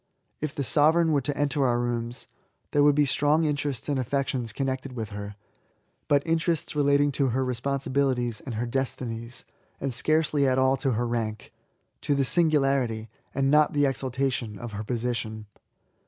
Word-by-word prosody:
If 155 -1 -4
the 140 - -1
sovereign 160 +5 +3
were 145 -2 +2
to 140 +3 -3
enter 145 -1 +1
our 120 -1 +1
rooms, 120 0 -3 0.5
there 145 - +3
would 145 0 +5
be 145 0 +4
strong 150 +4 +2
interests 145 -4 -2
and 145 -3 0
affections 130 -2 -1
connected 130 +2 -3
with 110 -3 -5
her, 100 0 -6 0.7
but 145 0 +3
interests 165 -1 0
relating 145 0 +3
to 140 0 +1
her 130 +2 0
responsi 130 +2 -2
bilities 125 -4 +1
and 125 -5 -5
her 115 +3 -1
destinies, 120 -2 -4 0.3
and 135 -2 -2
scarcely 150 +2 +2
at 130 0 +2
all 130 0 +4
to 135 -1 0
her 120 +2 0
rank 115 -3 -3 0.3
— - - -48
^to 145 - +1
the 135 - +2
singularity, 135 - +2 0.2
and 135 0 +2
not 150 0 +4
the 145 -1 +2
exalta 135 -1 0
tion, 110 -5 -4
of 120 +1 -7
her 105 +1 -5
position. 115 -2 -3
135 Hz, 175 wpm, -26 LUFS, 120-145 Hz, 0.7 s, would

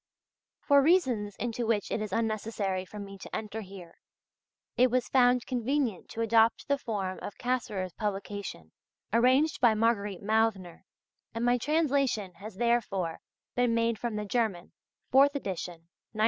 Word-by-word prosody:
For 280 -1 +5
reasons 260 - +2
into 235 -1 -3
which 215 -3 0
it 215 - -1
is 215 -2 -4
unnecessary 215 -3 -1
for 210 - -11
me 195 -1 -8
to - - -7
enter 220 0 -4
here, 185 -4 -12 0.8
it 255 +1 +4
was 250 0 0
found 250 -2 +3
convenient 250 -4 -1
to 230 - -5
adopt 225 0 +3
the 280 0 +1
form 195 -7 -3
of 205 - -7
Cassirer's 210 -8 -2
publication 200 - -5 0.4
arranged 260 +7 +3
by 235 -3 +5
Margarete 210 -4 0
Mauthner, 215 -5 0 0.5
and 230 +1 -1
my 245 0 +3
translation 275 - +1
has 210 0 -9
therefore 210 -7 0 0.3
been 245 -2 +2
made 230 -1 +1
from 235 -3 -3
the 210 0 -3
German 205 -5 -1 0.4
(Fourth 280 +2 +5
Edition, 175 -8 -5 0.3
1911). 215 - -8
225 Hz, 150 wpm, -29 LUFS, 200-245 Hz, 0.8 s, For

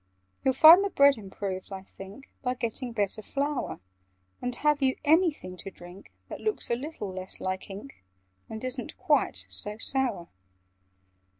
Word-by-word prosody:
"You'd 265 -1 +2
find 325 +7 +9
the 400 - 0
bread 280 -5 +5
improved, 190 -1 -6
I 190 -1 -6
think, 195 +7 -12
By 250 -1 -1
getting 240 +1 -3
better 210 -1 -1
flour: 280 - -2 0.6
And 250 0 -2
have 295 +2 +2
you 260 -1 +2
anything 300 - +2
to 195 - -7
drink 175 +1 -13 0.2
That - - -8
looks 430 - -2
a - - +3
little 245 -7 -6
less 185 0 -5
like 185 +1 -4
ink, 200 - -10 0.5
And 220 +1 -7
isn't 255 0 -4
quite - - +2
so 210 0 -3
sour?" 230 -8 -1
240 Hz, 155 wpm, -28 LUFS, 195-280 Hz, 0.6 s, find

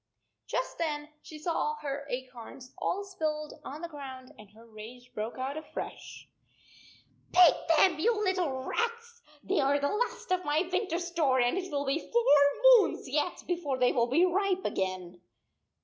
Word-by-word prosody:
n - - -57 0.4
Just - - -3
then 300 -2 -2
she 310 - -11
saw 305 -1 -1
her 285 -1 -5
acorns 255 0 -8
all 400 +2 -1
spilled 310 -6 -3
on 295 +3 -8
the - - -3
ground, 265 -4 -9
and 210 -2 -14
her 220 +3 -18
rage 235 +3 -12
broke 220 +3 -4
out 265 +3 -3
afresh. 315 - -8 0.5
" - - -27
Pick 355 -3 +7 0.2
them 370 +3 +5
up, 310 - -10
you 445 +5 +2
little 350 -9 0
rats! 465 - -3 0.2
They 390 - 0
are 275 +1 +3
the 285 0 0
last 435 -3 -2
of 365 0 +1
my 310 +3 +1
winter 370 -1 -1
s 345 0 -3
store, 295 -7 +2
and 245 +3 +2
it 370 -1 -4
will 285 -1 -1
be 275 +4 0
four 470 +3 +5
moons - - -7
yet 300 +6 -1
before 335 -7 -2
they 250 -1 +3
will 235 -1 +1
be 315 +9 +4
ripe 380 +1 0
again." 185 -2 -3
300 Hz, 180 wpm, -29 LUFS, 260-365 Hz, 0.5 s, Pick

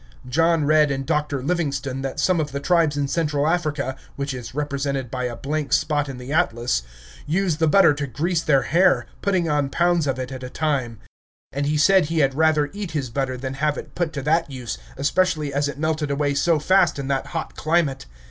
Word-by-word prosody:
John 165 +3 +2
read 150 0 +4
in 135 -1 -2
Dr. 145 -2 -1
Livingstone 140 -5 -2
that 135 -1 -4
some 185 -2 +2
of 150 -2 -2
the 140 - -3
tribes 160 0 +2
in 140 -1 0
Central 150 0 0
Africa 150 -5 -1 0.2
(which 140 0 -3
is 125 0 -8
represented 140 -3 -2
by 125 -1 -2
a 120 -1 -3
blank 145 +4 -3
spot 145 -2 +1
in 135 - -6
the 125 +3 -6
atlas) 120 - +1 0.5
use 175 0 +1
the 160 0 +2
butter 185 -1 +6
to 145 0 -4
grease 160 +7 -1
their 140 -4 +3
hair, 180 +4 +3 0.2
putting 185 -4 +1
on 145 -2 +1
pounds 170 -1 +1
of 135 -2 0
it 130 0 -5
at 130 -1 -7
a 125 - -6
time; 130 -7 -1 0.6
and 140 +1 -1
he 150 +1 +1
said 190 +3 +5
he 165 +2 -3
had 135 -3 +3
rather 155 0 +2
eat 200 -5 -5
his 135 -6 -2
butter 130 0 -2
than 130 +1 -4
have 150 +1 0
it - - -8
put 175 -2 -1
to 140 - -4
that 160 +2 +1
use, 125 -4 -6 0.2
especially 150 0 +1
as 145 +1 +1
it 145 - -5
melted 155 -1 -1
away 140 0 0
so 160 +4 +2
fast 180 +1 +3
in 140 -1 -4
that 135 -1 -1
hot 165 -2 -5
climate. 155 - 0
145 Hz, 215 wpm, -22 LUFS, 135-160 Hz, 0.6 s, butter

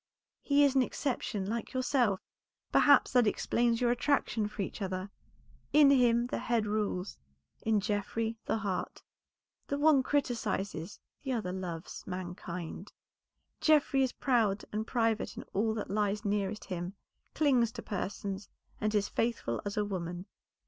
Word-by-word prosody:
He 285 0 +4
is 280 -2 +4
an 265 - +4
exception 240 -6 -2
like 225 +5 -3
yourself; 250 -6 +1 0.5
perhaps 285 -2 +6
that 245 -3 +4
explains 235 +2 +1
your 245 -1 +3
attraction 240 -4 +1
for 210 -1 -4
each 200 - -7
other. 185 0 -3 0.6
In 295 -2 +7
him 240 -3 +4
the 245 - -3
head 230 -2 +1
rules, 205 -3 -2 0.4
in 220 -1 +2
Geoffrey 210 +2 -1
the - - 0
heart. 200 -4 -3 0.6
The 280 - -1
one 295 -2 +5
criticises, 215 - -2 0.2
the 265 -2 -2
other 200 -7 -2
loves 175 -3 -6
mankind. 180 0 -6 0.7
Geoffrey 295 -3 +4
is 260 -2 +2
proud 220 -6 +1
and 215 +2 -2
private 225 -3 0
in - - -5
all 220 +2 +1
that 210 - -4
lies 210 +1 0
nearest 205 0 -1
him, 180 0 -4 0.4
clings 255 -7 +3
to 230 - -7
persons, 200 0 -4 0.3
and 215 0 0
is 205 -1 +2
faithful 225 - -1
as 205 +1 -4
a 210 - +2
woman. 180 -2 -4
215 Hz, 145 wpm, -31 LUFS, 195-245 Hz, 0.7 s, In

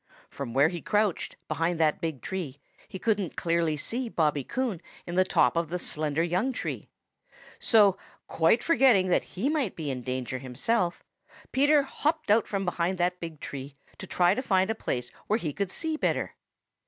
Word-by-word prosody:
From 130 -5 -6
where 140 +3 +5
he 175 -1 -5
crouched, 210 -3 0
behind 165 +1 -1
that 155 0 +2
big 160 -7 -3
tree, 165 -8 -4 0.3
he - - -7
couldn't 205 -3 0
clearly 165 -2 +1
see 240 - -3
Bobby 150 -7 +1
Coon 240 - -2 0.2
in 175 - -6
the 185 +1 +4
top 185 - +3
of 165 -2 0
the 180 - -2
slender 155 -2 -1
young 180 +10 0
tree. 250 - -5 0.7
So, 205 -5 +5 0.3
quite 165 +9 +2
forgetting 245 - +4
that 180 - 0
he 225 +9 +1
might 290 - 0
be 150 -4 -3
in 130 -1 -4
danger 130 0 -3
himself, 170 - -1 0.5
Peter 285 +2 +4
hopped 300 -1 -1
out 220 +2 +4
from 195 -1 -2
behind 175 +1 0
that 180 +1 0
big 165 -3 -7
tree 140 0 -7 0.2
to 190 - -7
try 175 0 +3
to 255 - -2
find 190 -4 +2
a - - +1
place 125 - -3 0.2
where 215 - +2
he 160 -10 -3
could 200 +3 -2
see 315 - -2
better. - - -1
180 Hz, 180 wpm, -28 LUFS, 155-220 Hz, 0.7 s, where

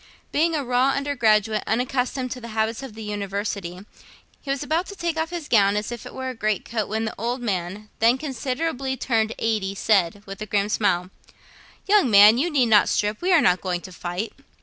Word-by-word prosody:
Being 330 +2 +2
a 290 - -1
raw 250 +2 +2
undergraduate, 220 -7 +1
unaccustomed 250 +2 -1
to 250 - -6
the 235 - -8
habits 220 +2 0
of 265 -6 -9
the 220 - -8
University, 200 -3 -4 0.6
he 275 - -10
was 275 +1 -1
about 320 +5 -1
to 400 - -8
take 340 -3 -2
off 320 0 -1
his 340 -3 -6
gown, 200 -3 +4
as 210 +3 -3
if 240 - -7
it - - -11
were 260 0 -4
a - - -4
great 215 -4 -1
coat, 220 -3 -2
when 220 +1 -1
the 220 - -3
old 240 +4 -2
man, 200 -2 -3
then 230 +3 +4
considerably 265 0 -3
turned 225 -3 0
eighty, 210 -3 -1
said, 200 -2 +1
with 195 +1 -9
a 215 - -4
grim 205 0 0
smile, 185 -4 0 0.7
'Young 400 -9 +4
man, 210 +2 +8
you 335 +6 +1
need 280 -6 +3
not 215 -3 +5
strip: 210 +1 0
we 365 +2 +1
are 340 -4 +6
not 180 -5 +3
going 180 -2 -2
to 185 - -10
fight.' 180 +5 -5
225 Hz, 210 wpm, -23 LUFS, 205-265 Hz, 0.7 s, man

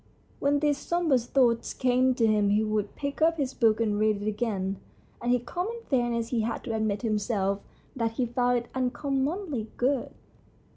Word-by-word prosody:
When 285 0 +2
these 295 -2 +2
sombre 340 -6 +2
thoughts 240 -1 +1
came 255 0 +2
to 230 - +2
him 210 -2 +3
he 210 +2 +3
would 215 -1 -1
pick 280 +1 -4
up 330 +1 +4
his 270 -3 -1
book 225 -3 +3
and 210 -2 +1
read 215 -1 +2
it 205 - -4
again, 205 -3 -1 0.4
and 240 - 0
in 250 -1 +3
common 370 - -3
fair 245 -3 +2
ness 235 -1 -2
he 235 -3 0
had 230 +1 -3
to 230 - -3
admit 220 -2 0
to 235 - -1
himself 205 -2 0 0.4
that 230 -3 -1
he 250 +2 0
found 245 +1 +1
it 240 0 -4
uncommonly 270 - -1
good. 260 0 +1
240 Hz, 190 wpm, -27 LUFS, 215-270 Hz, 0.4 s, up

